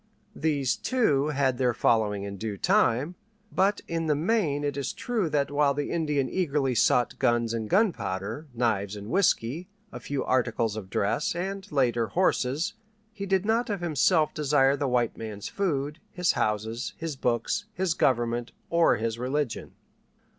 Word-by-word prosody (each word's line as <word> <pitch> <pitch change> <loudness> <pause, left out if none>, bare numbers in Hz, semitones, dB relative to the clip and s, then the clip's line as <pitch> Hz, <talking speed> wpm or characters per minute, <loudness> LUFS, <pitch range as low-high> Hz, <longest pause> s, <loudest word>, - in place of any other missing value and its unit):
These, 145 -4 0
too, 150 - +1
had 135 -4 0
their 125 -3 +2
following 105 -4 +2
in 100 0 -6
due 105 -1 -4
time. 165 - +2 0.4
But 200 +2 +2
in 165 -1 -2
the 150 - +3
main 155 -3 0
it 145 -1 -1
is 140 -1 -3
true 220 -9 -1
that 145 -2 0
while 145 -1 +2
the 145 0 -2
Indian 150 -5 0
eagerly 145 -6 0
sought 120 0 +2
guns 120 -1 +2
and 110 -2 -3
gunpowder, 115 - 0
knives 110 -4 0
and 105 +1 -8
whiskey, 175 - +1 0.2
a - - -7
few 140 -2 -3
articles 120 -4 +1
of 100 -4 -7
dress, 105 - 0
and, 195 +3 -4
later, 120 -5 +1
horses, 155 - 0 0.4
he 200 -2 -5
did 190 0 +1
not 225 +2 +1
of 200 -4 -2
himself 160 0 +2
desire 140 -2 +3
the 140 0 -1
white 125 -2 0
man's 105 -2 -6
food, 150 -5 -2
his 180 -1 +1
houses, 110 +3 -2
his 165 -3 -4
books, 120 - -1
his 185 -4 0
government, 120 -4 0 0.2
or 170 0 +4
his 115 +1 -3
religion. 130 0 -2
140 Hz, 160 wpm, -27 LUFS, 115-170 Hz, 0.4 s, or